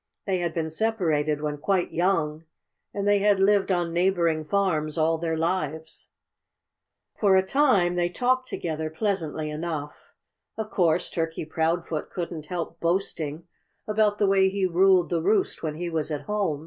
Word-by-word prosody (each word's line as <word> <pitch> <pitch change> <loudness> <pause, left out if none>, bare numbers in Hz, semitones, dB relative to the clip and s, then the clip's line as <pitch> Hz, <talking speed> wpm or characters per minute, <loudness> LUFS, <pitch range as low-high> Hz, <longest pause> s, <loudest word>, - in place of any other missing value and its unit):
They 190 -2 0
had 170 -2 -2
been 160 -1 -2
separated 160 -7 0
when 150 -1 -3
quite 185 +3 0
young; 165 -3 0 0.5
and 200 0 -3
they 205 0 +4
had 200 -1 +3
lived 195 0 +3
on 175 -2 0
neighboring 170 -3 +1
farms 160 -5 0
all 160 0 +2
their 165 -1 -1
lives. 160 -2 -3 1.1
For 200 -3 +3
a 190 0 +3
time 205 -9 +3
they 175 0 0
talked 255 +6 0
together 160 -6 -3
pleasantly 160 -4 -2
enough. 150 -2 -6 0.4
Of 220 -1 -4
course 175 -1 +1
Turkey 165 -1 -3
Proudfoot 160 0 -1
couldn't 165 -4 -5
help 175 -1 -5
boasting 170 -3 -2 0.4
about 210 -1 +2
the 205 - +2
way 195 -1 +4
he 195 0 0
ruled 185 -1 +3
the 170 -2 +1
roost 200 +3 +1
when 155 -2 -3
he 175 +2 -4
was 160 -2 -2
at 150 -2 -3
home. 200 -8 -1
175 Hz, 160 wpm, -25 LUFS, 160-195 Hz, 1.1 s, they